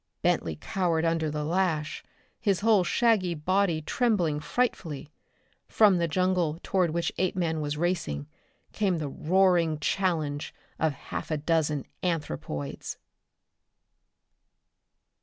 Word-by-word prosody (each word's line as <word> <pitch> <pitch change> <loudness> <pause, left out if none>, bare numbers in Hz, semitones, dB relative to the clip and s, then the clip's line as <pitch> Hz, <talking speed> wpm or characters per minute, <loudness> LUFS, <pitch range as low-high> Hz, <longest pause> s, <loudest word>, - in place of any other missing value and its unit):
Bentley 80 - +1
cowered 170 - 0
under 165 -1 +1
the 150 0 -3
lash. 160 -2 0 0.4
His 200 -5 +1
whole 215 -3 +4
shaggy 190 -3 +2
body 175 0 +1
trembled 175 -9 +1
frightfully. 160 - -2 0.6
From 205 -5 +5
the 170 - +1
jungle 180 -2 +1
toward 185 -3 +1
which 170 +2 -1
Apeman 170 -4 0
was 145 0 -2
racing 155 - -1 0.5
come 195 -4 +1
the 155 -2 -3
roaring 170 +1 +2
challenge 155 -4 -1 0.2
of 160 - +2
half - - -6
a 155 - 0
dozen 150 -2 0 0.2
anthropoids. 75 - -3
170 Hz, 110 wpm, -28 LUFS, 150-185 Hz, 0.6 s, From